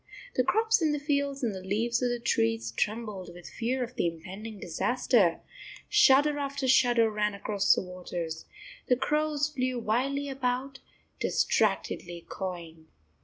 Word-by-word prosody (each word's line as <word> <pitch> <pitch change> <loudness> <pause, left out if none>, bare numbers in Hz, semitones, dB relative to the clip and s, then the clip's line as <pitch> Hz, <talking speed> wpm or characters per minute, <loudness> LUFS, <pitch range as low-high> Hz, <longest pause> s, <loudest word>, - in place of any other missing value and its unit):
The - - +2
crops 445 -2 +2
in 310 -2 +2
the 295 - -1
fields 280 -1 -1
and 225 -4 0
the 190 - -6
leaves 225 +6 0
of 250 - +2
the 240 - -1
trees 115 - 0
trembled 210 - -3
with 175 0 -12
fear 250 +2 -2
of 245 +1 -7
the 175 - 0
impending 195 +6 -7
disaster; 200 0 +1 0.5
shudder 295 -8 +5
after 275 -1 -2
shudder 240 -3 +4
ran 210 -1 0
across 200 0 +2
the - - -2
waters; 175 -3 -6 0.4
the 250 - +4
crows 300 +2 0
flew 255 -3 -2
wildly 260 +5 0
about, 265 0 -2 0.4
distractedly 175 -1 0
cawing. 170 -4 -6
235 Hz, 145 wpm, -29 LUFS, 185-275 Hz, 0.5 s, shudder